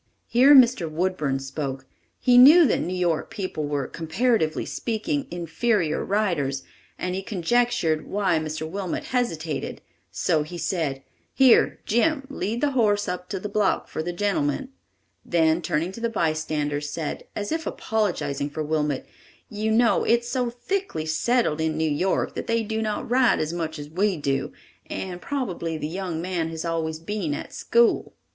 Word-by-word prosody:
Here 265 +5 +6
Mr. 240 - +5
Woodburn 155 -4 -1
spoke. 135 0 -5 0.3
He 250 - +4
knew 310 +7 +9
that - - +2
New 175 - -3
York 175 -3 0
people 185 -8 -4
were, 145 -2 -1
comparatively 165 - 0
speaking, 255 +5 -2
inferior 175 0 0
riders, 160 -10 0 0.3
and 180 - -3
he 190 - -2
conjectured 195 -4 0
why 190 -5 +1
Mr. 155 0 -4
Wilmot 185 +1 -3
hesitated; 165 - -2 0.3
so 155 - +1
he 155 +4 -6
said: 150 -7 -2 0.3
"Here, 265 -3 +5
Jim, 275 +5 +1
lead 230 -3 -3
the 290 -1 +2
horse 210 -5 +2
up 180 0 -4
to 195 - -3
the 210 - -4
block 205 -1 +1
for - - -4
the 175 +2 -3
gentleman"; 195 - -1 0.5
then 165 -1 +2
turning 165 +2 -1
to 230 - -9
the 235 - 0
bystanders, 155 -6 -1
said, 155 -1 -4
as 205 0 -3
if 320 0 -2
apologizing 175 -10 -1
for 155 +2 -4
Wilmot: 150 -2 -1 0.4
"You 215 +1 -2
know 230 +2 +3
it 235 +1 +3
is 240 - -8
so 250 -2 0
thickly 245 - -3
settled 160 0 +1
in 160 -1 0
New 160 0 +1
York 180 +6 0
that - - -5
they 230 0 +1
do 220 +1 -2
not 215 +3 -2
ride 250 +1 +4
as 155 +2 -2
much 160 -2 -3
as 145 0 -7
we 185 +4 0
do, 140 -2 -1 0.4
and 180 -2 -5
probably 180 - -3
the 150 - -3
young 175 -1 -4
man 175 -3 -1
has 165 0 -5
always 160 -1 -2
been 165 -2 -3
at - - -7
school." 235 0 +2
180 Hz, 165 wpm, -24 LUFS, 155-230 Hz, 0.5 s, knew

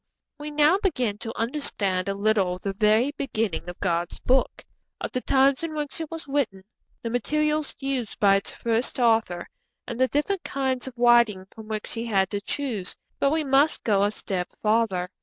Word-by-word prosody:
] - - -63
We 295 +1 -5
now 300 +5 +4
begin 245 - 0
to 225 0 -6
understand 205 -7 -1
a 195 - -1
little 200 -3 +1
of 180 - -14
the 195 - -2
very 215 +6 +3
beginning 220 - -2
of 175 - -9
God's 175 -1 -1
Book 260 +1 +1 0.3
of - - -4
the 255 - -2
times 275 +2 +3
in 330 -2 -4
which 300 +2 -4
it 320 - -5
was 325 -2 -7
written, 270 -9 -1 0.4
the 230 - -3
materials 305 +4 0
used 270 -5 -3
by 195 -1 +5
its 195 - -5
first 230 +1 -1
author, 225 -8 +2 0.4
and 235 -1 -6
the 260 - +4
different 340 +8 -1
kinds 265 -2 -2
of 260 - -8
writing 235 -5 +4
from 220 -1 -11
which 215 -1 -4
he 230 +1 -3
had 195 -3 +1
to 205 -1 -2
choose; 225 -6 -3 0.2
but 275 - +3
we 315 +2 +1
must 280 +2 +2
go 205 -3 +2
a 205 - +3
step 190 -3 -3
farther. 210 -5 +1
230 Hz, 195 wpm, -25 LUFS, 200-275 Hz, 0.4 s, by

